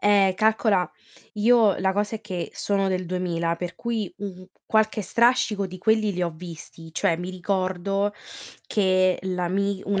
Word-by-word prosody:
Ehm, 200 -2 +4
calcola 215 -3 +2 0.5
io 220 -1 +4
la 190 0 +1
cosa 210 +2 -1
è - - -14
che 185 -5 -5
sono 195 -1 0
del 185 -1 -1
2000, 170 -2 -1
per 175 0 -5
cui, 225 -5 -3
mhmm, 190 -2 -7 0.2
qualche 220 -1 +2
strascico 230 -3 +2
di 185 0 -9
quelli 215 0 +2
li 180 - -2
ho 170 - 0
visti. 165 -1 -10
Cioè 170 -3 +1
mi 180 +2 -5
ricordo 190 +2 -1 0.5
che 185 -2 +2
l'ami 190 +2 -1
un' 200 0 +1
195 Hz, 155 wpm, -25 LUFS, 180-210 Hz, 0.5 s, Ehm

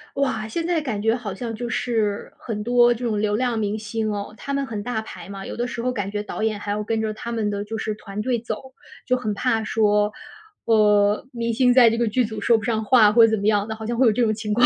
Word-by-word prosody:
哇， 260 -6 -1
现 330 +10 -3
在 340 -2 +1
感 240 -9 -3
觉 225 +1 +2
好 230 -5 -4
像 230 +1 -5
就 240 +2 -4
是， 220 -4 -1
很 210 -3 -5
多 240 +1 +4
这 240 - -8
种 215 -3 0
流 210 -1 +1
量 240 -1 0
明 210 0 -1
星 215 0 -3
哦， 205 0 -5
他 280 - -5
们 280 0 0
很 215 -5 -5
大 220 0 -2
牌 220 - -10
嘛。 195 0 -7
有 - - -6
的 240 +1 -1
时 235 - -5
候 250 +1 0
感 205 -5 -3
觉 205 0 -3
导 215 - -6
演 220 -1 0
还 205 0 -5
要 210 +1 -1
跟 225 0 -1
着 215 -1 -2
他 235 +2 -6
们 220 -2 -1
的 205 0 -3
就 220 +1 -5
是 215 -1 -2
团 205 0 -6
队 240 +1 0
走， 235 +3 -7 0.3
就 255 0 +2
很 215 -4 -2
怕 225 +1 0
说， 210 -1 +2 0.5
呃， 210 -1 +3
明 235 -1 -2
星 250 +1 +4
在 245 -3 +7
这 230 - -1
个 235 0 +1
剧 245 +4 +2
组 220 -1 -4
说 230 +3 +4
不 220 - -6
上 220 -2 -1
话 220 -5 +6
或 230 +1 +7
者 220 - -1
怎 220 - +2
么 200 - -3
样 210 0 +2
的， 220 - -4
好 220 0 -8
像 235 +1 -2
会 255 0 +5
有 220 - +4
这 240 +3 +1
种 215 - +2
情 215 -1 -3
况。 240 +3 +5
220 Hz, 305 characters per minute, -23 LUFS, 210-240 Hz, 0.5 s, 在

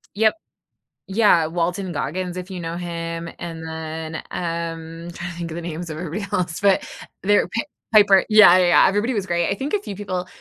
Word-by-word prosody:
Yep. 220 +4 +3 0.7
Yeah, 195 -5 +4
Walton 175 +3 -2
Goggins, 180 +4 -3
if 180 +2 -7
you 185 - -5
know 165 0 -4
him, 170 -1 -4
and 165 -1 -6
then, 160 0 -6 0.2
um, 165 0 -4
trying 175 +1 -6
to - - -12
think 170 -1 -5
of - - -6
the - - -4
names 170 0 -6
of 155 - -5
everybody 180 +4 -4
else, 180 -3 -1
but 195 -1 +3 0.4
they're 205 +1 +3
pa 230 - -1 0.3
Piper 205 -3 +6
yeah, 215 -4 +8
yeah, 185 -1 +4
yeah, - - +6
everybody 205 +6 0
was 205 - -1
great. 175 -1 0
I - - +1
think 270 +8 -4
a 415 - +3
few 205 - -7
people 185 -2 -4
175 Hz, 200 wpm, -22 LUFS, 165-195 Hz, 0.7 s, yeah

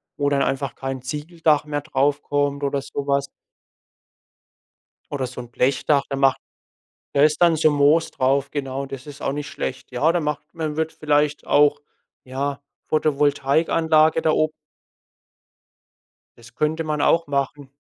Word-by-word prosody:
wo 145 -1 0
dann 140 -1 +1
einfach 135 -1 -1
kein 135 -1 -5
Ziegeldach 150 +2 0
mehr 145 -1 -3
drauf 140 -1 0
kommt 145 0 -1
oder 140 0 0
so 140 +1 -5
was. 140 0 +1 1.8
Oder 135 -3 -2
so 125 0 -8
'n 120 - -12
Blechdach, 140 +3 +1
da 135 - -2
macht 135 -1 +3 0.7
da 140 - +3
ist 150 +2 +3
dann 170 -2 +5
so 155 0 +4
Moos 145 +3 +3
drauf, 135 +2 0
genau. 135 -1 -3
Das 135 +1 -9
ist 140 -1 -10
auch - - -1
nicht 145 +1 -4
schlecht. 130 - -5
Ja, 145 +7 +2
da 175 - 0
macht 150 -1 -2
man 155 -3 -3
wird 160 0 -1
vielleicht 150 -1 0
auch, 145 0 +4 0.5
ja, 135 +2 -3 0.3
Photovoltaikanlage 155 +2 +2
da 155 - +2
ob 155 0 +2 1.9
das 120 +1 -17
könnte 160 +2 0
man 150 -1 -2
auch 165 -2 +3
machen. 140 0 -2
145 Hz, 150 wpm, -22 LUFS, 135-155 Hz, 1.9 s, dann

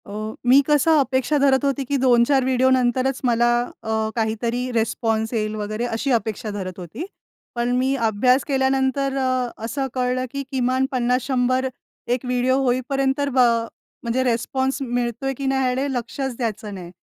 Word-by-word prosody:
अ, - - -9 0.3
मी 260 +3 +7
कसं 300 +2 +4
अपेक्षा 265 +2 +1
धरत 275 0 +3
होती, 275 0 0
की 280 +2 0
2-4 255 +2 +4
व्हिडिओ 260 0 +3
नंतरच 255 +1 +1
मला 240 0 +3 0.3
अ, 220 0 -1
काहीतरी 235 +2 -1
रिस्पॉन्स 225 0 0
येईल 215 -1 -1
वगैरे 215 +2 -3
अशी 245 +4 -2
अपेक्षा 220 -2 -1
धरत 190 -2 -6
होती. 180 - -6 0.5
पण 240 0 0
मी 260 +2 +1
अभ्यास 250 +5 +3
केल्यानंतर 270 0 +1
अ, 255 -2 0 0.2
असं 270 +4 -2
कळलं, 255 0 0
की 280 0 -4
किमान 260 0 +1
50-100 255 +1 +1 0.5
एक 255 - -8
व्हिडिओ 250 +1 +1
होईपर्यंत 265 +2 0
ब 265 - -4
अ, 230 -2 +3 0.4
म्हणजे 240 +2 0
रिस्पॉन्स 260 +3 -1
मिळतोय, 245 +1 -2
की 275 +1 -6
नाही 265 0 +1
ह्याकडे 255 +2 0
लक्षच 250 +2 -3
द्यायचं 220 -3 -3
नाही. 175 -2 -9
250 Hz, 155 wpm, -22 LUFS, 235-265 Hz, 0.5 s, मी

